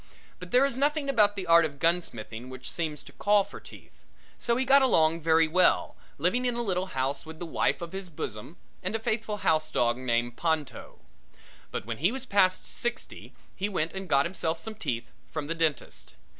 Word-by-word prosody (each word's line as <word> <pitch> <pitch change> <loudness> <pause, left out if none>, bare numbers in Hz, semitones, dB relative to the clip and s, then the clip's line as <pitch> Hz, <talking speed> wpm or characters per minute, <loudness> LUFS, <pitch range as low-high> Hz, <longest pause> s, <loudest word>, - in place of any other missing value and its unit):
But 180 -1 -9
there 250 +7 +5
is 265 -2 -2
nothing 290 0 +1
about 210 -5 +4
the 190 -2 -4
art 170 0 +6
of 145 -3 -3
gunsmithing 130 -8 -1
which 130 0 -7
seems 155 -4 -3
to - - -13
call 205 0 +3
for - - -11
teeth, - - -14 0.5
so 235 - +1
he 260 +2 0
got 275 +2 +6
along 165 -10 +3
very 160 0 +4
well, 180 +4 +3 0.2
living 180 - +1
in 245 - 0
a 240 - 0
little 185 -3 -1
house 135 +2 -1
with 160 0 -10
the 175 - -6
wife 165 - 0
of 170 - -7
his 190 -1 -6
bosom 130 0 -6 0.2
and 185 +4 -3
a - - 0
faithful 215 -1 -2
housedog 155 -7 +2
named 120 -1 -1
Ponto. 155 -6 -2 0.7
But - - -5
when 115 +1 -5
he 175 +8 +3
was 265 +1 -5
past 190 -5 +2
sixty 240 0 -4 0.2
he 200 +2 -2
went 165 -5 -1
and 190 -2 -5
got 140 0 +4
himself 170 -2 -2
some 220 +7 -7
teeth 120 - -4 0.2
from 155 -3 -4
the 160 - -2
dentist. 160 -5 -2
170 Hz, 200 wpm, -28 LUFS, 150-210 Hz, 0.7 s, art